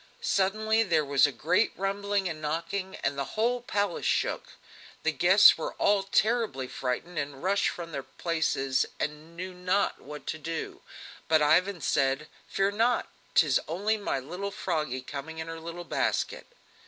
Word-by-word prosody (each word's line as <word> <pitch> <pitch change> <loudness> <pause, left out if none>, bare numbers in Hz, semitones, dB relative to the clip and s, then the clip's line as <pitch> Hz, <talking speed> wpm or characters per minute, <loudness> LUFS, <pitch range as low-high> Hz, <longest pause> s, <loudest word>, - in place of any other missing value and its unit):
Suddenly 215 +3 +2
there 165 -8 +2
was 140 +1 +4
a - - -3
great 180 - +1
rumbling 200 0 -1
and 160 -3 -5
knocking, 170 +5 -3
the 140 -1 0
whole 240 +3 +1
palace 205 -6 -1
shook. - - 0 0.5
The - - +2
guests - - +6
were - - -4
all 205 -1 +3
terribly 210 - +1
frightened 130 +8 -3
and 140 -2 -5
rushed 195 +2 +2
from 170 -1 -7
their 140 - -3
places, 135 -5 0
and 155 +3 -5
knew 185 +1 -5
not 180 +2 0
what 150 +1 -9
to 155 - -4
do; 165 +1 -5 0.5
but 155 -1 +4
Ivan 175 +4 +3
said: 135 +1 +1 0.2
"Fear 195 +1 +1
not, 230 +4 +1 0.3
'tis 145 -7 +5
only 200 +7 0
my 205 -9 -2
little 180 +9 -5
Froggy 155 -9 -2
coming 150 +4 -7
in 160 - -4
her 165 0 -6
little 170 +2 -7
basket!" - - -1
170 Hz, 155 wpm, -28 LUFS, 150-200 Hz, 0.5 s, guests